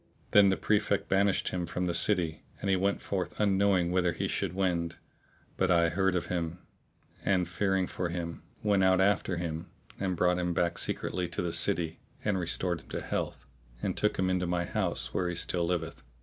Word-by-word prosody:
Then 100 -1 +7
the 95 - +1
Prefect 105 -1 +1
banished 95 0 +2
him 90 -2 -3
from 90 +2 -2
the 85 - 0
city; 85 -3 +1 0.2
and 100 - -1
he - - +4
went 100 +2 0
forth 90 -3 -3
unknowing 95 -3 +3
whither 90 -2 +2
he - - -2
should - - -2
wend; 85 -3 0 0.6
but 95 - +2
I 85 -2 +4
heard 95 +2 +1
of 90 - 0
him 85 -1 -3 0.7
and 90 -3 +2
fearing 95 +1 0
for 90 -1 -3
him 85 -1 -4 0.2
went 100 -2 +3
out 95 0 +4
after 95 -2 +2
him 80 -1 -4 0.3
and 95 -2 -1
brought 90 +1 +2
him 90 -1 -1
back 85 0 +1
secretly 90 -1 -1
to 85 +1 -3
the 85 -1 -1
city 80 -1 +3 0.3
and 100 -3 +1
restored 85 0 -1
him - - -21
to - - -4
health - - -3 0.3
and - - -2
took 105 - 0
him 95 - +1
into 90 -1 0
my 85 0 0
house - - 0
where 90 -1 0
he 90 - -3
still 85 0 +1
liveth. 85 -2 -2
90 Hz, 195 wpm, -30 LUFS, 85-95 Hz, 0.7 s, Then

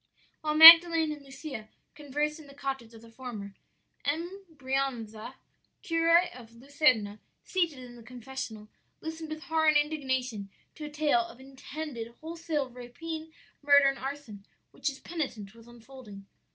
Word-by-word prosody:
"While 305 -1 -1
Magdalen 330 0 +10
and 300 -1 -7
Lucia 270 -5 -9 0.2
conversed 295 +1 -3
in 305 - -14
the 275 - -15
cottage 270 -5 -5
of 225 - -14
the 230 - -15
former, 225 -5 -8 0.5
M. 345 +7 -3
Brianza, 260 -5 -3 0.5
curé 335 +2 +2
of 230 -2 -14
Luserna, 245 -5 +1 0.2
seated 340 -6 -1
in 250 -1 -11
the - - -13
confessional, 240 -2 -8 0.3
listened 320 0 -7
with 310 +1 -7
horror 320 -1 0
and 305 -1 +5
indignation 260 -8 -2 0.2
to 305 - -8
a - - -6
tale 300 +3 +1
of 345 -8 -9
intended 265 -3 -8
wholesale 325 -3 -3
rapine, 315 +7 -8 0.3
murder, 285 -1 +6
and 275 - -5
arson, 265 -7 -7 0.3
which - - -5
his 275 -2 -1
penitent 240 - -5
was 230 0 -17
unfolding. 240 -4 -13
275 Hz, 145 wpm, -29 LUFS, 240-315 Hz, 0.5 s, Magdalen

